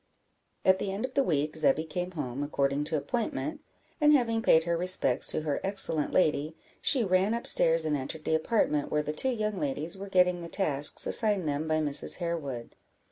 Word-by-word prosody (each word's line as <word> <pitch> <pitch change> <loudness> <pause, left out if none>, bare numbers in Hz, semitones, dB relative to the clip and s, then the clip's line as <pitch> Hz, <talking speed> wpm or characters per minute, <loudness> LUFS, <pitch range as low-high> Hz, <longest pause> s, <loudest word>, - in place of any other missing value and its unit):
At 190 0 +4
the 195 - -3
end 200 +5 -3
of 260 - -9
the 275 - +2
week, 150 - -1
Zebby 155 -1 +3
came 180 +3 -5
home, 140 -4 -5
according 140 0 -1
to 155 0 -2
appointment; 275 - -4 0.4
and 300 0 +5
having 230 -5 +1
paid 160 -6 +4
her 170 0 -1
respects 175 -7 +4
to - - +3
her 150 -2 -3
excellent 190 -6 0
lady, 155 -3 0 0.3
she 265 -5 +2
ran 190 +3 +1
up 235 - -6
stairs, 165 0 +2
and 155 -1 0
entered 145 +3 -6
the - - -1
apartment 160 -3 0
where 150 0 0
the 150 - -4
two 260 +12 -1
young 215 -4 -3
ladies 155 +5 -4
were 200 0 -8
getting 180 -2 +2
the 170 - -8
tasks 150 -7 0
assigned 205 -7 +3
them 150 +2 -3
by 155 0 0
Mrs. 145 -2 +2
Harewood. 150 -9 -5
165 Hz, 195 wpm, -28 LUFS, 150-195 Hz, 0.4 s, and